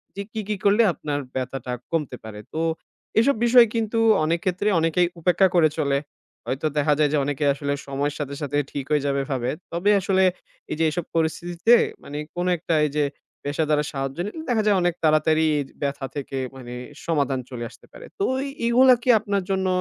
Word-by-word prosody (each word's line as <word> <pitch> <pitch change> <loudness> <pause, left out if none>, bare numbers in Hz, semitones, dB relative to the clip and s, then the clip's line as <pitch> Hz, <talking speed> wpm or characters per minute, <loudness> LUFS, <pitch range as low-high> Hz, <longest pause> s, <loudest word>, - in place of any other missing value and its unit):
যে 200 - -4
কি, 220 - -2
কি 210 - +1
করলে 205 +3 +5
আপনার 145 -1 -3 0.2
ব্যথাটা 130 -1 -4 0.2
কমতে 160 -5 -1
পারে। 105 -1 -8
তো, 160 - -1 0.6
এসব 280 +5 +3
বিষয় 240 0 +7
কিন্তু 225 0 0 0.3
অনেক 165 +2 +1
ক্ষেত্রে 185 +2 0
অনেকেই 165 +2 +2
উপেক্ষা 180 +3 +4
করে 160 -2 +5
চলে। 140 -2 +2 0.5
হয়তো 135 +4 -1
দেখা 150 0 +3
যায় 150 - +4
যে - - +3
অনেকে 145 +1 -1
আসলে 140 0 -2
সময়ের 140 +1 -2
সাথে, 140 -1 -4
সাথে 145 0 -1
ঠিক 140 -2 -4
হয়ে 150 -2 +2
যাবে 140 0 +1
ভাবে। 125 -1 -1 0.2
তবে 175 +5 +2
আসলে 190 0 +2 0.5
এই - - -1
যে 165 - +3
এসব 175 +1 -3
পরিস্থিতিতে, 170 +6 +2 0.3
মানে 145 - -7 0.2
কোন 175 0 -1
একটা 165 0 -1
এই - - -7
যে 150 - +3 0.4
পেশাদারের 150 +1 0
সাহায্য 135 0 -3
নিলে 215 +10 -6
দেখা 225 -3 +2
যায় 205 -2 +4
অনেক 175 0 +2
তাড়াতাড়ি 155 0 +3
এজ 140 - -3
ব্যথা 140 -1 -2
থেকে 135 -1 -4 0.2
মানে 125 -2 -9 0.3
সমাধান 140 -5 0
চলে 120 -2 -6
আসতে - - -18
পারে। - - -11
তো 395 - +2 0.2
এ - - -4 0.2
এইগুলা 255 +2 +6
কি - - -2
আপনার 200 -2 -1
জন্য 190 -1 0
155 Hz, 190 wpm, -24 LUFS, 140-190 Hz, 0.6 s, বিষয়